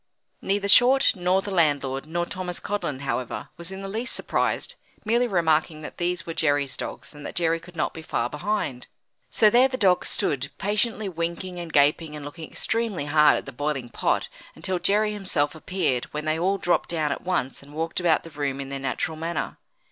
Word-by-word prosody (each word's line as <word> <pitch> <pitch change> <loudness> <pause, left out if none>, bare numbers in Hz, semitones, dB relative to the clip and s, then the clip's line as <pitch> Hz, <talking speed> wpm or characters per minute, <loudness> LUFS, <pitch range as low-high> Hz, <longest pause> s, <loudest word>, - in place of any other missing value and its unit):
Neither 200 +1 0
Short 250 +6 +7
nor 185 +1 +1
the 200 - -5
landlord 145 -5 +1
nor 175 +2 -1
Thomas 180 -1 -4
Codlin, 150 -10 -3
however, 130 -3 -3
was 170 +2 -6
in 190 0 -7
the - - -4
least 225 +6 -1
surprised, - - -1 0.3
merely 235 +3 +3
remarking 160 -5 +1
that - - -8
these 175 0 -1
were 165 - -4
Jerry's 145 -4 +1
dogs, - - -6
and 145 0 -11
that - - -6
Jerry 165 -1 +2
could 175 +1 -15
not 160 - -1
be 160 - -8
far 120 -6 -1
behind. 150 -4 -3 0.4
So 215 -2 +5
there 250 +3 +6
the 255 -1 -4
dogs 190 -6 +3
stood, 140 0 0
patiently 210 +1 +1
winking 175 +1 -3
and 170 -2 -6
gaping 150 +2 +3
and 150 -1 -7
looking 160 +2 -8
extremely 225 -9 -1
hard 150 +1 +5
at - - -5
the 140 - -7
boiling 135 -2 -2
pot, - - 0 0.3
until 185 -1 -2
Jerry 210 +4 +2
himself 185 -8 +1
appeared, 160 -6 -1
when 150 +1 -6
they 155 +1 0
all 190 +3 +2
dropped 175 -2 +1
down 155 -4 0
at - - -3
once, 175 -8 -1
and 140 +1 -15
walked 160 +3 -2
about 175 -3 +3
the 165 - -11
room 140 -2 -2
in 135 -1 -5
their 140 0 -4
natural 135 +4 -2
manner. 165 +1 -3
165 Hz, 200 wpm, -25 LUFS, 145-195 Hz, 0.4 s, Short